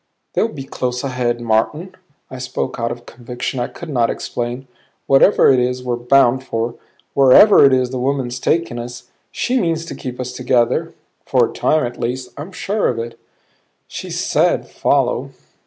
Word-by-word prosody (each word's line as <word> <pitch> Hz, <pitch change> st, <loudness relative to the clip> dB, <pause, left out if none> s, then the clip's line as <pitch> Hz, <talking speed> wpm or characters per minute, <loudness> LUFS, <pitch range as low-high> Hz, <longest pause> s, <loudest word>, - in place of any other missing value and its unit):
"They'll -, -, +2 dB
be 145 Hz, -11 st, -8 dB
close 125 Hz, -1 st, -3 dB
ahead, 125 Hz, -3 st, -1 dB
Martin." 120 Hz, +11 st, 0 dB, 0.4 s
I 130 Hz, -, -7 dB
spoke 130 Hz, 0 st, -4 dB
out 115 Hz, 0 st, -1 dB
of 120 Hz, 0 st, -6 dB
a -, -, -24 dB
conviction 125 Hz, +2 st, -6 dB
I 120 Hz, -, -1 dB
could 170 Hz, -, -10 dB
not 120 Hz, -5 st, +1 dB
explain. 120 Hz, +2 st, -4 dB, 0.4 s
"Whatever 135 Hz, +4 st, +5 dB
it 130 Hz, -, +4 dB
is 125 Hz, +1 st, -1 dB
we're 125 Hz, -1 st, -1 dB
bound 125 Hz, +1 st, +3 dB
for, 115 Hz, -2 st, -2 dB, 0.4 s
wherever 140 Hz, +10 st, +7 dB
it 135 Hz, -, +6 dB
is 130 Hz, -1 st, +1 dB
the 130 Hz, -, -3 dB
woman's 130 Hz, -1 st, -1 dB
taking 150 Hz, -5 st, 0 dB
us, 120 Hz, +1 st, -9 dB, 0.2 s
she 255 Hz, +1 st, 0 dB
means 165 Hz, -2 st, -1 dB
to -, -, -7 dB
keep 125 Hz, -1 st, -7 dB
us 125 Hz, 0 st, -4 dB
together 125 Hz, -2 st, 0 dB, 0.3 s
for -, -, +2 dB
a -, -, -10 dB
time 155 Hz, -3 st, +1 dB
at 120 Hz, 0 st, -7 dB
least. 125 Hz, +1 st, -3 dB
I'm 150 Hz, +7 st, -8 dB
sure 205 Hz, +3 st, -1 dB
of 120 Hz, -, -1 dB
it." 115 Hz, 0 st, -6 dB, 0.7 s
"She -, -, -7 dB
said -, -, +1 dB
follow." -, -, 0 dB
125 Hz, 175 wpm, -19 LUFS, 120-135 Hz, 0.7 s, wherever